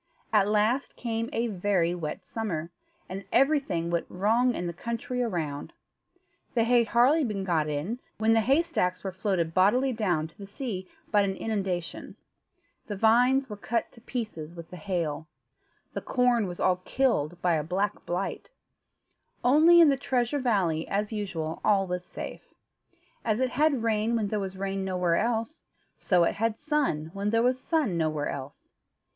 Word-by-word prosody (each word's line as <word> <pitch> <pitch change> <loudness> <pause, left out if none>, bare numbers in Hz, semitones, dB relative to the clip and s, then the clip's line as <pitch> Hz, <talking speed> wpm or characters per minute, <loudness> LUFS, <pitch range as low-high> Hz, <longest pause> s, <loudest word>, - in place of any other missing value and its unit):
At 205 -2 +5
last 215 +6 +1
came 230 -1 -3
a 230 - 0
very 185 -5 +1
wet 175 +2 -5
summer, 175 -8 -4 0.4
and 195 +2 -6
everything 250 - +2
went 170 -1 -1
wrong 230 +6 +2
in 175 - -3
the 170 - -3
country 235 +6 -3
around. 160 -11 -3 0.8
The 230 - +4
hay 240 +1 +4
had 235 - +1
hardly 260 +8 +4
been 210 -6 -2
got 165 -5 +1
in, 155 +12 -3 0.2
when 220 +1 +3
the 225 - +4
hay 270 +9 +3
stacks 180 - -1
were 190 - -3
floated 185 -3 -1
bodily 245 +9 +3
down 180 -9 0
to - - -24
the 200 - -8
sea 200 -4 -5 0.2
by 210 - +5
an 195 -1 0
inundation; 190 -6 -3 0.7
the 205 - -3
vines 245 +6 +4
were 210 - -6
cut 230 +2 -2
to 230 - -17
pieces 210 -10 -5
with 170 -1 -10
the - - -7
hail; 165 -3 -2 0.7
the - - -3
corn 245 -4 +2
was 175 -1 -7
all 180 -1 +3
killed 180 - 0
by 175 -1 +3
a 155 -2 +1
black 195 +6 -2
blight; 180 +3 -3 0.9
only 315 +7 +7
in 330 -3 +8
the 275 - +2
Treasure 255 +1 0
Valley, 190 - +1
as 210 +2 -1
usual, 170 -7 -4
all 200 -2 +3
was 180 -1 -3
safe. - - -9 0.7
As 220 0 0
it 260 -1 +1
had 285 -3 +2
rain 225 +1 +1
when 215 -3 0
there 215 - -1
was 190 -1 -5
rain 195 0 -2
nowhere 180 -3 +1
else, 230 +6 -1 0.4
so 180 -4 +3
it - - +2
had 225 +1 0
sun 280 - -1
when 200 +1 -1
there 230 +1 +2
was 250 +1 +2
sun 295 - 0
nowhere 155 -2 0
else. 140 0 -8
205 Hz, 175 wpm, -28 LUFS, 175-240 Hz, 0.9 s, in